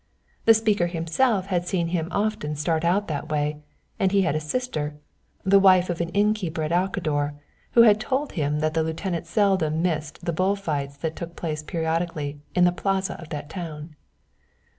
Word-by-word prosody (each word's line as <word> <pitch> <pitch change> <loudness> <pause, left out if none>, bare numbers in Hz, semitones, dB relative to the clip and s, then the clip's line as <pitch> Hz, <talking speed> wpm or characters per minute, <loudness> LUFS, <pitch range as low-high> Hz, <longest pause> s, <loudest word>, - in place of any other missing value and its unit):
The 225 - +8
speaker 210 -5 +2
himself 180 +5 +1
had 180 -3 -1
seen 175 -2 0
him 165 -2 -1
often 200 -7 -1
start 160 +2 0
out 190 +4 +2
that 155 0 -4
way, 150 0 0 0.4
and 190 - +2
he 200 -1 +4
had 155 - +1
a - - +1
sister, 155 -4 -3 0.5
the 195 +1 +5
wife 185 -2 +5
of 170 - -3
an 170 - -2
innkeeper 200 -4 0
at 155 - -2
Alcador, 165 -5 0 0.4
who 235 - +8
had 215 -2 +6
told 265 +6 -1
him 150 -2 -1
that 155 0 +1
the 160 - +2
lieutenant 165 +1 -3
seldom 170 -5 +2
missed 155 -4 -2
the 170 - 0
bull 185 +5 +2
fights 145 -7 -3
that 160 +2 -3
took 170 -1 -7
place 155 -2 -3
periodically 160 -2 -2 0.2
in 180 - +4
the 175 - +5
Plaza 195 +1 -1
of 160 - -11
that 145 -1 -5
town. 160 -2 -7
170 Hz, 185 wpm, -25 LUFS, 155-195 Hz, 0.5 s, The